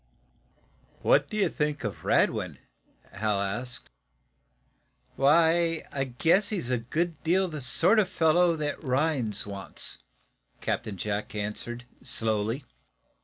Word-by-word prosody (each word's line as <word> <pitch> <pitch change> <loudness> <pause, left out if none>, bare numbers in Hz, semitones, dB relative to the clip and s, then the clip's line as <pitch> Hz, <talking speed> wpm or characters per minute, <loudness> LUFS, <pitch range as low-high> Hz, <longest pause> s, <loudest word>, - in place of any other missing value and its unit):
"What - - +4
do 215 - -4
you 205 - +3
think 150 -2 -2
of 105 -3 -5
Radwin?" - - +1 0.5
Hal 105 0 -1
asked. 110 +6 -3 1.3
"Why, 165 +3 +3
I 135 -1 -1
guess 165 - +2
he's 180 - -2
a 125 - +1
good 155 +7 -2
deal 185 +4 +2
the 155 -4 -6
sort 180 - +5
of 195 -3 +2
fellow 170 0 +3
that 150 -1 -3
Rhinds 130 -6 0
wants," 100 -2 -3 0.6
Captain 105 -3 -3
Jack 105 +3 -3
answered, 110 +4 -4 0.2
slowly. 115 0 -1
135 Hz, 120 wpm, -28 LUFS, 110-165 Hz, 1.3 s, sort